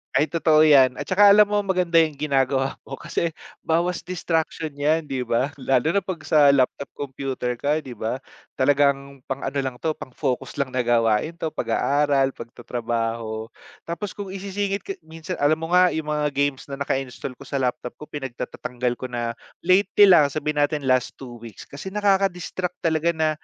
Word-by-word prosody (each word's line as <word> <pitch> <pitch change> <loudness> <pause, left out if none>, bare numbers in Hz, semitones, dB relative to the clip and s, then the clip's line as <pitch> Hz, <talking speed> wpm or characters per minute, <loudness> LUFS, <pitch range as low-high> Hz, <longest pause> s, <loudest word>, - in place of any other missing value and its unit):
Ay, 145 +4 +3
totoo 160 -2 +3
‘yan. 130 -4 +5
At - - -5
saka 200 +2 +6
alam 210 +1 +7
mo, 205 0 0
maganda 180 -3 0
yung 155 -3 -4
ginagawa 135 -2 +1
mo 135 - -8
kasi 170 0 -2 0.3
bawas 170 +2 0
distraction 165 -2 -2
‘yan, 150 +2 +1
di 130 -2 -2
ba. 125 +4 -1
Lalo 135 +2 +1
na 200 - +2
‘pag 185 -3 -5
sa 145 -2 +6
laptop, 140 0 0
computer 135 -3 -4
ka, 145 +5 0
‘di 130 -5 -9
ba. 110 +4 -3 0.4
Talagang 140 0 +1
pang 135 0 -4
ano - - -5
lang 130 -2 -5
'to, 160 -1 -1
pang - - -10
focus 130 +1 -3
lang 140 - +1
na 130 - +1
gawain 115 +3 +2
‘to, - - -1
pag-aaral, 140 -2 +1
pagtatrabaho 115 -2 -4 0.4
tapos 185 +4 -4
kung 205 -1 -7
isisingit 195 +1 -3
ka 390 - -5
minsan 165 +3 -7
alam 145 +2 +4
mo 165 +1 -5
nga 180 0 +6
yung 160 -1 -3
mga 150 0 +1
games 140 -1 -1
na 140 - -5
naka-install 135 -2 -3
ko - - -10
sa 140 - -2
laptop 125 -1 -2
ko, - - -12
pinagtatatanggal 125 -2 -4
ko 130 - -4
na 120 -1 -3 0.3
lately 195 +3 +5
lang, 155 -5 +7
sabihin 150 +1 -2
natin 145 0 +1
last 130 -1 +1
2 120 -3 -10
weeks 115 -3 -11
kasi 140 +7 -10
nakaka-distract 190 -3 0
talaga 160 0 +2
na 160 -1 +1
145 Hz, 180 wpm, -23 LUFS, 130-170 Hz, 0.4 s, alam